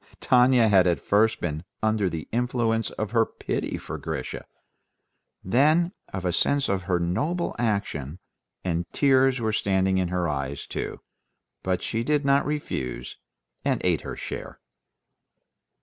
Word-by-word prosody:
Tanya 125 -2 +5
had 95 -3 +5
at 85 - +2
first 110 +2 +2
been 80 -2 -3 0.2
under 110 -3 +2
the 80 -2 -5
influence 115 -2 0
of 110 -1 -4
her 115 -1 +4
pity - - -3
for - - -6
Grisha, - - -5 1.0
then 155 - +3 0.2
of 95 -1 -4
a 90 - +1
sense 140 +8 +2
of 95 -1 +1
her 90 - +3
noble 150 - -1
action, 100 - -1 0.5
and 85 -1 -2
tears 135 -2 +4
were 110 -2 0
standing 95 -2 +2
in 90 - +1
her 90 -1 -1
eyes 70 -2 -3
too; - - -5 0.6
but 95 -1 -1
she 115 +1 -1
did 150 +2 +1
not 140 +1 +3
refuse, 65 - -4 0.5
and - - +1
ate - - +2
her - - -6
share. - - -7
110 Hz, 145 wpm, -26 LUFS, 90-125 Hz, 1.0 s, Tanya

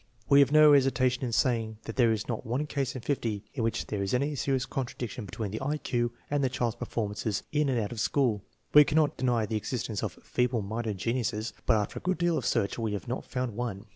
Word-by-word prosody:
We 140 - +7
have 140 0 +5
no 155 -1 +8
hesitation 130 -2 +3
in 125 - -1
saying 115 -1 +1
that 115 - -6
there 120 -3 +4
is 110 -2 -2
not 115 -3 -3
one 125 +6 -1
case 140 -3 -2
in 125 - -6
fifty 115 -7 -1
in 135 - -3
which 115 - -1
there 105 -2 -3
is 100 +4 0
any 140 +4 0
serious 135 -1 0
contradiction 120 -4 -4
between 105 0 -4
the 110 - -4
I 145 +3 -1
Q 120 -4 -1 0.2
and 145 -1 +1
the 130 - +2
child's 120 -3 -1
performances 105 -3 -2
in 150 -1 +2
and 125 -3 +1
out 105 -2 -2
of 120 - -5
school. 120 -5 +1 0.3
We 150 - +10
cannot 150 0 +2
deny 120 -4 +1
the 110 +1 -1
existence 110 -1 -3
of - - -4
" - - -30
feeble 125 -3 +1
minded 110 0 -3
geniuses," 115 0 -1
but 115 - +5
after 105 - -2
a - - -22
good 185 0 0
deal 175 0 +2
of - - -1
search 100 - 0
we 110 -2 -1
have 100 - -5
not 120 - -3
found 125 -3 -3
one. 105 -4 -4
120 Hz, 240 wpm, -29 LUFS, 110-135 Hz, 0.3 s, We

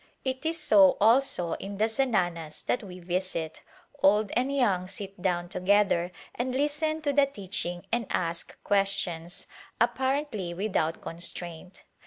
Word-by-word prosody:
It 260 +4 -2
is 330 +1 -1
so 200 -9 +6
also 225 -5 +3
in 200 0 -6
the 215 - +3
zananas 180 - -1
that 245 - 0
we 185 -4 -9
visit; 175 -2 -3 0.4
old 210 +1 +4
and 255 +3 +1
young 200 -10 +1
sit 195 0 -7
down 175 -2 0
together 185 -2 +2 0.2
and 250 +1 -2
listen 300 +3 0
to 285 -1 +1
the 280 0 +5
teaching 185 -7 -4
and 235 -2 0
ask 170 -1 -2
questions, 195 -4 0 0.3
apparently 260 -10 0
without 175 -4 -1
con 165 - -7
straint. 175 +1 -6
195 Hz, 140 wpm, -28 LUFS, 175-255 Hz, 0.4 s, so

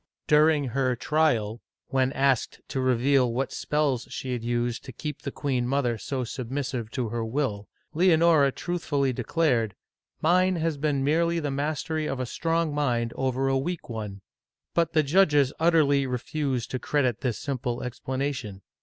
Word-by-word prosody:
During 150 -2 +4
her 130 0 +1
trial, 120 -6 +1 0.3
when 130 -1 +2
asked 135 -3 +1
to 130 - -2
reveal 130 0 +3
what 130 +3 -2
spells 145 -5 0
she 130 - -5
had 120 -2 -4
used 120 0 -1
to - - -7
keep 150 +4 -6
the 140 - -4
queen 130 -4 -1
mother 125 -4 0
so 130 +5 -3
submissive 125 -1 -4
to 125 -4 -2
her 115 +1 -2
will, 110 -4 -2 0.2
Leonora 165 -4 +4
truthfully 145 -5 -1
declared, 120 - 0 0.3
" - - -67
Mine 185 +3 +4
has 165 -2 -1
been 140 -2 0
merely 170 +4 +2
the 145 -3 -2
mastery 155 +2 -2
of 135 - -3
a 130 - -1
strong 165 +4 -1
mind 120 -5 0
over 130 0 0
a 135 0 +2
weak 170 +3 -4
one.'* 105 -4 -5 0.5
But 165 -1 +1
the 155 -1 +4
judges 145 -3 +4
utterly 150 -5 +3
refused 130 0 -2
to 130 - -2
credit 125 -3 0
this 125 -4 -1
simple 125 -3 -3
explanation. 130 -5 -4
135 Hz, 160 wpm, -26 LUFS, 125-150 Hz, 0.5 s, During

